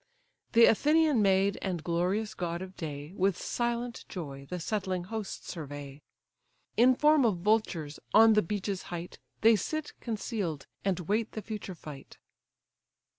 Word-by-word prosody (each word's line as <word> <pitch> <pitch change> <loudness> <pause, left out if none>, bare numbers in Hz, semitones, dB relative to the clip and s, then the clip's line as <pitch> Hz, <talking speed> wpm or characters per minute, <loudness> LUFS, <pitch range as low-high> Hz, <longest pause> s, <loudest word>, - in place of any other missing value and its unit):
The 230 0 +8
Athenian 300 +2 +4
maid, 195 0 +3
and 180 -5 -3
glorious 185 +6 0
god 170 0 -3
of 190 0 -10
day, 150 0 -6
With 190 -1 +1
silent 240 0 -2
joy 140 -6 -7
the 180 - -3
settling 185 -1 -2
hosts 215 +1 -5
survey: 145 -3 -7 0.7
In 255 +2 +6
form 300 +1 +5
of 215 -6 +2
vultures, 185 -8 0
on 225 +1 +7
the 210 - +5
beech's 200 0 -3
height 175 0 -6 0.2
They 225 +1 +7
sit 310 - -3
conceal'd, 205 - -3 0.2
and 185 -2 0
wait 210 +6 -1
the 215 - -5
future 210 -4 -6
fight. 145 -4 -11
195 Hz, 140 wpm, -30 LUFS, 170-225 Hz, 0.7 s, The